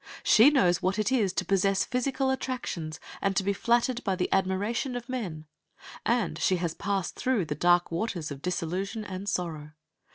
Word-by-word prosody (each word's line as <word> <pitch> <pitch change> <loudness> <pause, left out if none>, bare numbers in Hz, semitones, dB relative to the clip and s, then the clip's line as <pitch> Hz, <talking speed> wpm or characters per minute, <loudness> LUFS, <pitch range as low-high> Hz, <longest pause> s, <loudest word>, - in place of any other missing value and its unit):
She 230 +6 +7
knows 180 - +3
what 185 +1 0
it 215 +4 0
is 220 -8 +2
to - - -1
possess 195 0 +2
physical 265 +2 0
attractions, 210 - -4 0.2
and 195 -1 0
to 190 - +2
be 200 +1 +1
flattered 240 +3 +1
by 195 -2 0
the 180 -1 -1
admiration 200 +7 0
of 245 0 -5
men, 190 -12 -4 0.6
and 230 -9 0
she 185 - +2
has 170 -2 -2
passed 195 -3 -2
through 250 -8 0
the 150 - -3
dark 175 +4 +3
waters 170 -4 -3
of 140 -1 -7
disillusion 185 +5 -3
and 195 +1 -5
sorrow. 155 -5 -3
195 Hz, 175 wpm, -28 LUFS, 175-235 Hz, 0.6 s, She